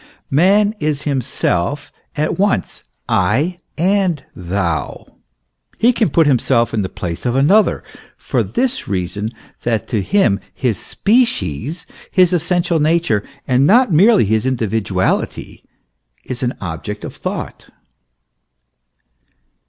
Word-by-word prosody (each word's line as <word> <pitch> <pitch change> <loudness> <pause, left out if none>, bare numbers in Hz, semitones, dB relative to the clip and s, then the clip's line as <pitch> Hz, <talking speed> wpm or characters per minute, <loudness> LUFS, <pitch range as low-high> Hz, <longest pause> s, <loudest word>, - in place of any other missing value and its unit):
Man 200 +8 +4
is 150 -2 -1
himself 135 - -1 0.3
at 155 +4 -1
once 200 0 0 0.2
I 175 +6 +1 0.2
and 180 -3 +1
thou; 85 -4 -3 0.7
he 240 +2 +4
can 225 -6 +1
put 165 +2 +3
himself 120 -4 +2
in 110 - +1
the 95 - -3
place 85 -2 -5
of 120 0 0
another, 185 +11 +3 0.3
for - - -1
this 260 +1 -2
reason, 100 +3 -2 0.3
that 115 -3 -1
to 110 - 0
him 115 - +2 0.2
his 120 -8 -1
species, 195 - 0 0.2
his 185 -1 +3
essential 175 0 +1
nature, 155 -9 +1 0.2
and 130 +2 +3
not 240 -2 +4
merely 200 - +5
his 110 +2 +1
individuality, 110 -7 -1 0.6
is 125 -1 -6
an 125 -1 -1
object 100 +4 -6
of - - -8
thought. - - -6
140 Hz, 115 wpm, -18 LUFS, -, 0.7 s, merely